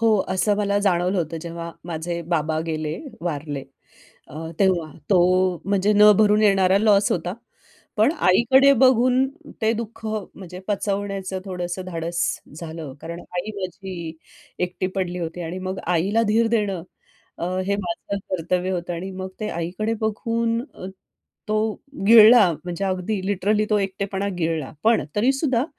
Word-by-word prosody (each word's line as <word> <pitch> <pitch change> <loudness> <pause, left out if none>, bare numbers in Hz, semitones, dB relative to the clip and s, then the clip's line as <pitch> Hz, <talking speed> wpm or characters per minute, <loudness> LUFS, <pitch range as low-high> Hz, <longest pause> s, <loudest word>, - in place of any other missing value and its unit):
हो, 225 -1 +4 0.2
असं 205 +2 +1
मला 200 -1 +1
जाणवलं 185 -1 +1
होतं. 165 -1 -2
जेव्हा 170 0 -6
माझे 170 0 -4
बाबा 155 0 0
गेले 155 0 -3 0.2
वारले 145 -4 -4 0.6
अ, - - -12 0.2
तेव्हा 180 -5 +2 0.2
तो 195 - +5 0.5
म्हणजे 200 +1 +2
न 210 0 +7
भरून 210 0 +4
येणारा 195 -2 +4
लॉस 205 -1 +4
होता. 175 +1 -2 0.6
पण 220 +7 +4 0.2
आईकडे 265 +8 +6
बघून 255 +1 +4 0.4
ते 220 +1 +3
दुःख 230 0 -6
म्हणजे 195 -4 -6
पचवण्याचं 195 -2 -2
थोडंसं 180 -1 -4
धाडस 170 -1 -3 0.4
झालं. 160 -4 -7
कारण 170 +1 -7
आई 180 +5 -5
माझी 185 -3 -6 0.5
एकटी 180 +1 -3
पडली 180 -2 -2
होती 170 0 -5
आणि 170 +2 -5
मग 185 0 -4
आईला 180 +6 +2
धीर 225 +2 +3
देणं 200 -6 0 0.6
अ, - - -2 0.2
हे 200 - +1
माझं 200 +1 -4
कर्तव्य 180 +1 -1
होतं 175 -1 -3
आणि 180 +3 -5
मग 185 0 -5
ते 215 - -2
आईकडे 180 +7 -2
बघून 230 +1 0 0.9
तो 215 0 +1 0.5
गिळला 220 -2 +8
म्हणजे 175 +2 -3
अगदी 190 +2 -1
लिटरली 205 +2 +1
तो 210 - +4
एकटेपणा 195 0 -2
गिळला. 160 -4 -1
पण 225 +1 +4
तरी 240 +6 +3
सुद्धा 265 -3 +1
190 Hz, 140 wpm, -23 LUFS, 175-210 Hz, 0.9 s, गिळला